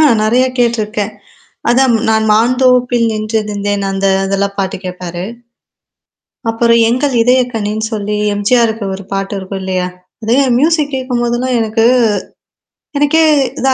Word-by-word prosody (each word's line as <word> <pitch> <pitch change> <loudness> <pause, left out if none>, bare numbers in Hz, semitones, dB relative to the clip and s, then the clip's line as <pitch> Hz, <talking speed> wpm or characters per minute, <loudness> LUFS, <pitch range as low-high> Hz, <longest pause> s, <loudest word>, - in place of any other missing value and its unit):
ஆ - - +5 0.2
நெறைய 240 +4 +3
கேட்டுருக்கேன். 220 -3 0 0.6
அதான் 255 +1 +3 0.2
நான் 220 0 +2
மான்ந்தோப்பில் 245 +1 +3
நின்றிருந்தேன் 210 -2 -2
அந்த 195 0 -1 0.2
அதெல்லாம் 200 +1 -1
பாட்டு 190 -1 -1
கேட்பாரு. 180 -1 -6 1.3
அப்புறம் 230 0 +3
எங்கள் 255 +3 0
இதயக்கனின்னு 225 -4 0
சொல்லி 210 -1 -2 0.2
எம்ஜிஆருக்கு 220 +1 +1
ஒரு 195 +1 -8
பாட்டு 195 +1 -2
இருக்கும் 190 0 -6
இல்லையா, 185 -1 -1 0.4
அது 225 +2 +1 0.2
மியூசிக் 300 0 +1
கேட்கும்போதெல்லாம் 250 -1 -1
எனக்கு 225 0 0 1.1
எனக்கே 295 +3 +3 0.4
இதா 265 0 +2
225 Hz, 115 wpm, -14 LUFS, 205-250 Hz, 1.3 s, ஆ